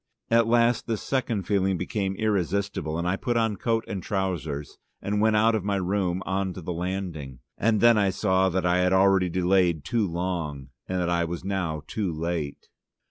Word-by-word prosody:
At 115 -1 +4
last 120 0 +3
this 115 -3 -2
second 120 -7 -1
feeling 95 -1 +1
became 95 +2 -2
irresistible, 100 -5 -1
and 85 +1 -2
I 95 +2 +1
put 120 +2 -1
on 115 -2 +1
coat 115 +2 0
and 95 - -4
trousers 85 -8 -3 0.2
and 105 +1 -1
went 110 0 +3
out 110 +2 +4
of 110 -4 0
my 100 0 0
room 95 -1 -1
on 95 0 -1
to 90 - -8
the 90 - -3
landing. 85 -7 -4 0.2
And 110 -1 +1
then 120 -2 +6
I 100 -1 +3
saw 95 -1 +2
that 95 0 -1
I 90 0 +3
had 90 +1 +2
already 95 -1 +4
delayed 90 -3 +2
too 115 -4 +1
long, 85 -6 -3 0.2
and 95 0 -1
that 90 -1 0
I 85 0 +2
was 85 +1 -5
now 90 -6 -2
too 100 +1 -2
late. 80 -2 -4
95 Hz, 190 wpm, -26 LUFS, 85-105 Hz, 0.2 s, then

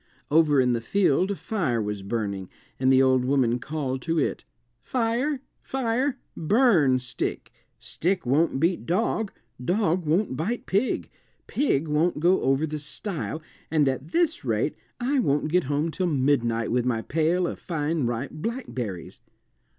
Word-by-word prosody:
Over 150 -2 +5
in 125 -1 +3
the 115 - -1
field 185 +5 +2
a 200 - -1
fire 160 - -1
was 105 -2 -3
burning, 100 -2 -3 0.3
and 130 0 +3
the 130 0 +6
old 130 -1 +3
woman 125 -2 +2
called 135 -2 -3
to 165 +3 -1
it, 150 - -1 0.4
"Fire, 255 +3 0 0.2
fire, 260 +1 -1 0.2
burn 165 - +4
stick; 125 0 -4 0.3
stick 180 0 -2
won't 140 +3 +2
beat 170 +4 0
dog, 205 +3 0 0.3
dog 180 - +1
won't 170 -1 +1
bite 205 - -2
pig, 205 +7 0 0.3
pig 165 - 0
won't 155 +2 +1
go 180 +4 +3
over 135 +3 +2
the 155 -1 -4
stile, 160 +1 -5 0.3
and 155 -3 +3
at 130 +2 -1
this 340 -1 +1
rate - - 0 0.2
I 265 +3 +1
won't 150 - +1
get 180 0 +2
home 145 +4 0
till 185 +2 -1
midnight 130 -6 +1
with 125 0 +2
my 115 -2 0
pail 165 +4 +1
of - - -4
fine 155 -4 -1
ripe 120 +3 -3
blackberries." 130 - -5
155 Hz, 150 wpm, -26 LUFS, 130-190 Hz, 0.4 s, the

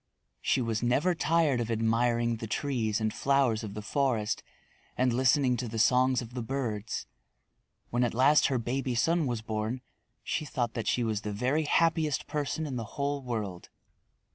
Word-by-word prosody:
She 130 - +1
was 115 -2 -1
never 135 +9 +2
tired 160 -6 +2
of 115 - -3
admiring 115 +1 +1
the 110 - -6
trees 110 -3 -1
and 110 -1 -1
flowers 135 -6 +2
of 105 -2 -6
the 105 - -5
forest 115 -4 0 0.6
and 125 -1 +2
listening 130 0 +3
to 120 - -3
the 115 0 -5
songs 125 +2 +3
of 115 +1 -11
the 125 - -3
birds. 115 -4 -3 0.9
When 120 +1 +2
at 120 - 0
last 140 +5 +5
her 135 -2 0
baby 125 +2 -2
son 165 +6 +2
was 120 -3 -2
born 110 +3 -3 0.4
she - - -2
thought 120 -5 -2
that 115 - -4
she 125 - +1
was 110 -3 -1
the 105 - -4
very 130 +9 0
happiest 160 -2 +2
person 150 +2 -2
in 135 -4 -4
the 115 - -3
whole 140 0 -1
world. 110 -8 -4
125 Hz, 175 wpm, -29 LUFS, 115-140 Hz, 0.9 s, last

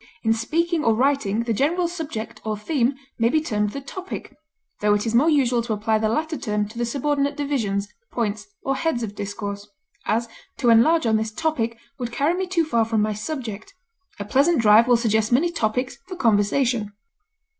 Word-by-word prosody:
In 225 -1 +3
speaking 320 +8 0
or 225 -1 +3
writing 235 -4 +1
the 230 -1 -1
general 335 - +1
subject 320 -10 -6
or 215 -1 -2
theme 255 +3 0 0.2
may 230 0 +3
be 310 - +3
termed 210 -9 -1
the 275 +6 -6
topic, 370 -1 -7 0.4
tho 210 0 +3
it 205 - -1
is 225 - -1
more 270 +8 +5
usual 255 -6 +3
to 230 -1 -2
apply 215 +1 +1
the 215 0 +1
latter 315 +6 -1
term 210 -3 -1
to 230 +2 -9
the 240 - 0
subordinate 280 +2 0
divisions, 225 -9 -1 0.2
points, 215 - -2 0.2
or 270 - 0
heads 265 -6 -1
of 210 -2 -4
discourse; 205 0 -5 0.4
as, 230 +2 +1 0.3
to 240 -4 +3
enlarge 310 +8 +5
on 220 -1 +3
this 220 0 -2
topic 230 -5 -1 0.2
would 240 -1 -3
carry 285 +7 +1
me 375 +1 -2
too 345 -3 +1
far 235 -7 +2
from 220 -1 +1
my 215 0 0
subject; 220 -2 -6 0.4
a 205 - -4
pleasant 280 +8 +3
drive 220 +1 +6
will 245 -1 +5
suggest 220 -1 +1
many 310 +8 +3
topics 250 -4 -1
for 370 - -6
conversation. 225 - +1
235 Hz, 190 wpm, -23 LUFS, 215-290 Hz, 0.4 s, drive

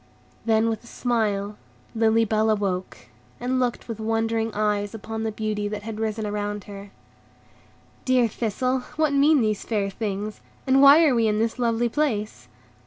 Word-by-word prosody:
Then, 220 0 +3
with 225 0 -2
a - - -16
smile, 210 -5 -1 0.4
Lily 225 0 +3
Bell 220 +1 +1
awoke, 195 -4 -2 0.3
and 255 +1 -1
looked 245 -2 -2
with 225 -2 -6
wondering 225 0 0
eyes 210 0 -1
upon 220 +1 -5
the 220 0 -2
beauty 210 -1 -2
that 205 0 -5
had 220 0 -6
risen 220 0 -2
round 205 -1 -3
her. 200 0 -10 1.1
"Dear 255 -2 +3
Thistle, 245 +4 -1 0.2
what 310 -2 +1
mean 285 0 +4
these 215 -2 0
fair 205 -3 -1
things, 210 0 -4 0.2
and 265 +1 +4
why 285 +4 +8
are 285 - +4
we 230 -2 +2
in 210 0 +1
this 225 +2 -1
lovely 235 0 +1
place?" 230 -6 -2
220 Hz, 165 wpm, -24 LUFS, 210-240 Hz, 1.1 s, why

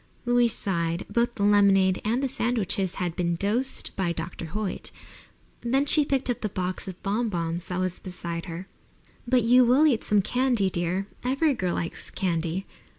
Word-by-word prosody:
Louise 240 -1 +3
sighed. 170 -4 -1
Both 235 0 +1
the 200 - -2
lemonade 195 -2 +4
and 235 +5 0
the - - +2
sandwiches 230 -7 -1
had 175 -3 -2
been 170 -1 0
"dosed" 225 +9 -1
by 185 -3 0
Dr. 170 0 -5
Hoyt. 200 +4 -4 0.7
Then 265 +4 +1
she 295 0 +4
picked 270 -1 0
up 245 - -2
the 215 - -1
box 185 0 -3
of 185 -1 -7
bon 220 +4 0
bons 170 -1 -3
that 180 0 -3
was 185 -1 -1
beside 170 -1 -5
her. 170 +2 -6 0.6
"But 250 -1 +3
you 250 +2 +6
will 255 +6 +5
eat 260 -8 +2
some 210 -2 +2
candy, 245 -5 +1
dear. 175 +3 -1 0.2
Every 275 +4 +2
girl 185 -8 -1
likes 165 - -4
candy." 175 0 -2
200 Hz, 175 wpm, -26 LUFS, 180-240 Hz, 0.7 s, you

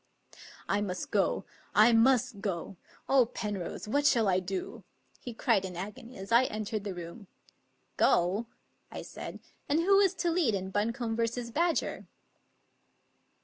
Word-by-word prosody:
" - - -17
I 205 +1 +1
must 185 -3 -4
go. 200 -2 +1 0.3
I 220 +3 +7
must 225 -3 +3
go. 190 -2 -3 0.3
Oh, 265 -3 +4
Penrose! 205 -4 -5
what 285 +6 +2
shall 230 -6 +3
I 185 -1 +3
do? 185 0 -5 0.2
'* - - -34
he 245 - -5
cried 225 -3 +1
in 180 -2 -6
agony 230 +6 -8
as 195 +3 -8
I 235 +3 +6
entered 215 -1 -4
the 195 -3 -4
room. 175 +4 -9 0.7
"Go?" 190 +7 +2 0.4
I - - -6
said; - - -8 0.3
"and 295 +3 +3
who 390 +3 +5
is 390 -1 +3
to 345 -2 0
lead 320 - +2
in 190 0 -4
Buncombe 225 +3 -1
v. 235 +1 -2
Badger?" 335 +5 0
220 Hz, 155 wpm, -30 LUFS, 195-250 Hz, 0.7 s, I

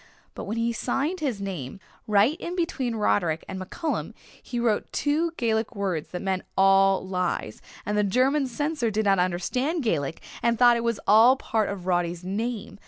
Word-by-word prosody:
But - - -7
when 215 +3 -4
he 230 +1 0
signed 275 +10 -1
his 260 -9 -2
name, 190 -6 -5 0.3
right 215 +7 +4
in 350 - -5
between 270 -9 -1
Roderick 175 -6 0
and 190 -1 -6
MacCallum, 305 - -4 0.3
he 240 - -4
wrote 230 -3 0
two 305 +4 +1
Gaelic 225 0 0
words 190 -6 -2
that 180 - -6
meant 190 -1 -1 0.2
'all 195 0 +4
lies' 180 - -2 0.2
and 210 - -1
the 210 - +2
German 260 +7 +2
censor 290 -1 -1
did 215 0 -1
not 195 -2 +3
understand 250 - -1
Gaelic 160 - -1 0.2
and 235 0 +2
thought 240 0 +6
it 235 - -2
was 230 -3 -1
all 225 +5 +7
part 220 -5 -1
of 195 -3 -6
Roddy's 175 -1 0
name. 215 +3 -4
215 Hz, 175 wpm, -25 LUFS, 190-250 Hz, 0.3 s, all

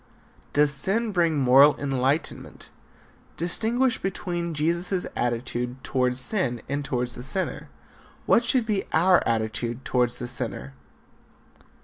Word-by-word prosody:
Does 145 0 +4
sin 205 +11 +1
bring 170 -5 +1
moral 135 +2 +6
enlightenment? 135 +2 -2 0.7
Distinguish 230 +9 0
between 175 -3 -3
Jesus' 170 +4 -1
attitude 120 +1 -3
toward 125 -1 0
sin 130 - 0
and 145 +2 -2
toward 125 -2 -2
the 125 - -5
sinner. 140 +9 -3 0.6
What 235 - +4
should 245 0 +1
be 210 -3 -1
our 180 +3 +4
attitude 115 +2 -2
toward 125 -2 +1
the 120 0 -5
sinner? 70 - -5
145 Hz, 115 wpm, -25 LUFS, 125-180 Hz, 0.7 s, moral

